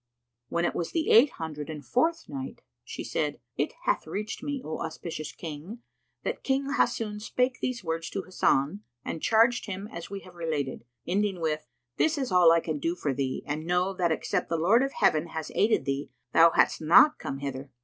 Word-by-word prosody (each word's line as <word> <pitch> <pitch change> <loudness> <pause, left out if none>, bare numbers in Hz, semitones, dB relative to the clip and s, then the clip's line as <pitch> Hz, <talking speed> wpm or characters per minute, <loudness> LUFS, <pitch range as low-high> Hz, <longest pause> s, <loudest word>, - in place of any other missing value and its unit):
When 170 +1 0
it - - 0
was 170 - -3
the 325 -1 +1
Eight 245 +4 +7
Hundred 155 -2 -6
and 150 -3 -7
Fourth 325 +6 +1
Night, 270 -1 -7 0.2
She - - -6
said, - - -2 0.2
It - - -1
hath - - 0
reached 210 +2 -4
me, 285 -1 -3
O 155 - -4
auspicious 160 -1 -5
King, 170 +9 -8 0.4
that - - -3
King 275 +1 0
Hassun 210 -6 0
spake 250 +3 0
these 250 -4 -2
words 165 0 -3
to 195 - -4
Hasan 180 -1 +1 0.2
and 160 - -4
charged 230 +2 +3
him 200 0 -5
as 170 0 -7
we 200 0 -6
have 185 - -14
related, 155 -8 -3 0.2
ending 195 0 0
with, 155 -4 -2 0.3
"This 315 0 +2
is 265 -6 -2
all 180 -2 +7
I 165 0 +4
can 155 -3 -3
do 165 +4 -1
for 145 -6 -1
thee 130 -1 -2
and 150 +2 -3
know 180 +2 +1
that 175 -3 +1
except 160 - -1
the 165 - 0
Lord 195 +9 +4
of 275 0 -1
Heaven 155 +2 +2
had 160 -1 -5
aided 220 +2 +2
thee, 140 +1 -2 0.2
thou 165 +1 +8
hadst - - +2
not 175 - +6
come 135 - -4
hither!" 135 0 -5
175 Hz, 200 wpm, -28 LUFS, 155-225 Hz, 0.4 s, thou